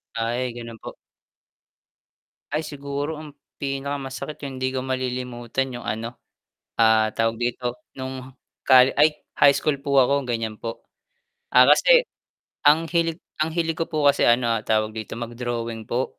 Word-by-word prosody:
Ay, 120 +2 -1
ganun 115 -1 -8
po. - - -9 1.6
Ay 150 +2 -1
siguro, 145 +1 -4
ang 155 -1 -9 0.3
pinakamasakit 140 +1 -4
yung 135 -2 -5
'di 130 0 -1
ko - - 0
malilimutan 130 0 -3
'yong 120 0 -8
ano, 115 +2 -4 0.6
ah, 110 -1 +5
tawag 115 0 0
dito, 120 0 -2 0.2
no'ng 130 0 -7 0.3
colle 130 0 +7
ay 150 +1 +5 0.2
high 140 -1 +7
school 150 -2 0
po 140 0 0
ako 140 +2 +2
gan'yan 115 -2 -3
po. 115 -1 -6 0.7
Ah, - - +7
kasi, - - +6 0.6
ang 155 +3 +6
hilig 165 -1 0 0.2
ang 160 - -1
hilig 165 -1 0
ko 165 - -1
po 155 -2 +1
kasi 140 - 0
ano 120 -2 +3
tawag 110 0 +1
dito 110 0 -6
mag-drawing 120 -1 -4
po, 125 +2 -2
130 Hz, 145 wpm, -23 LUFS, 120-140 Hz, 1.6 s, colle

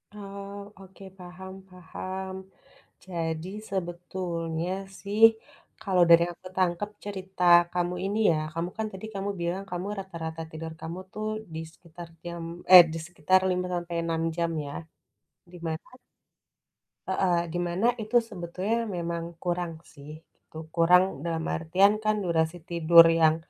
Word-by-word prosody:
Oh, 200 0 -8 0.2
oke, 195 +1 -14 0.2
paham 185 +1 -10 0.2
paham. 185 +1 -6 0.7
Jadi 165 -1 -3 0.2
sebetulnya 175 -2 -3 0.3
sih 205 +2 -3 0.6
kalau 185 -3 +3
dari 170 0 +8
yang 175 - -7
aku 185 - -11
tangkap 185 +3 +1 0.2
cerita 190 -2 -5 0.3
kamu 180 0 -1
ini 205 +2 -1
ya - - +2 0.2
kamu 170 +2 -2
kan 220 0 -1
tadi 190 +3 -7
kamu 195 +1 -2
bilang 175 +3 -2
kamu 180 +2 -3
rata-rata 165 -4 -6
tidur 160 0 -6
kamu 165 +3 -5
tuh 215 0 -4 0.3
di 160 - -4
sekitar 170 0 -12 0.2
jam 170 -1 -6 0.3
eh, 180 -2 +13
di - - -3
sekitar 175 +2 +3
5 180 0 0
sampai 175 -1 -4
6 165 -1 -1
jam 170 -1 0
ya, 140 - -6 0.8
di - - -10
mana 160 0 -4 1.2
heeh, 180 -3 +2 0.2
di 175 - -1
mana 185 +7 +1
itu 215 +3 -5
sebetulnya 195 +5 -2
memang 170 -1 -3 0.2
kurang 175 -1 -2 0.2
sih 150 +2 -11
itu. 160 - -18 0.2
Kurang 180 +2 +6 0.2
dalam 165 -1 -2
artian 185 +5 +3
kan 215 0 +2
durasi 165 0 0
tidur 170 0 +7 0.2
yang, 155 0 +6
175 Hz, 140 wpm, -27 LUFS, 165-190 Hz, 1.2 s, eh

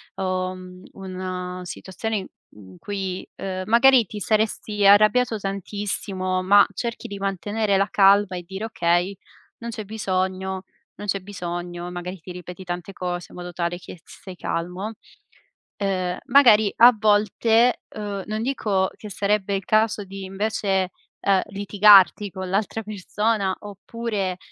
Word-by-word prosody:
uhm, 185 -1 -4
una 185 -1 -5
situazione 205 +4 -4
i 190 - -5 0.2
in 95 -3 -15
cui, 190 -2 -4
ehm, 185 -1 -4
magari 240 +1 +6
ti 210 - -8
saresti 210 -1 0
arrabbiato 215 +3 +5
tantissimo, 195 -1 -3
ma 200 +2 +6
cerchi 235 -1 -4
di 200 - -6
mantenere 200 +2 -1
la 195 +1 +2
calma 195 -1 +4
e 175 - -6
dire: 190 +4 -7
"Okay, 175 -3 +1 0.4
non 235 - -7
c'è 220 -2 -5
bisogno, 190 -2 -2 0.3
non 205 - -8
c'è 195 0 0
bisogno", 175 -2 -6
magari 180 +1 -6
ti 180 - -9
ripeti 180 +1 -9
tante 180 +1 -5
cose 175 -1 -4
in - - -13
modo 180 0 -7
tale 175 0 -2
che 180 0 -11
s - - -27 0.2
stai 185 -2 -10
calmo. 180 +6 -4 0.8
Ehm, 185 -3 -1
magari 235 -6 +6
a 240 +1 +8
volte, 220 +3 +3
uhm, 205 -2 -4
non 215 +1 -3
dico 205 -8 0
che 210 - -9
sarebbe 200 0 0
il 195 - -4
caso 215 -1 +2
di 195 0 -8
invece, 195 -1 -1 0.3
ehm, 195 -2 +3
litigarti 200 0 +5
con 190 -2 -6
l'altra 210 +3 -1
persona 210 0 -1
oppure, 205 -2 -4
195 Hz, 140 wpm, -23 LUFS, 185-210 Hz, 0.8 s, a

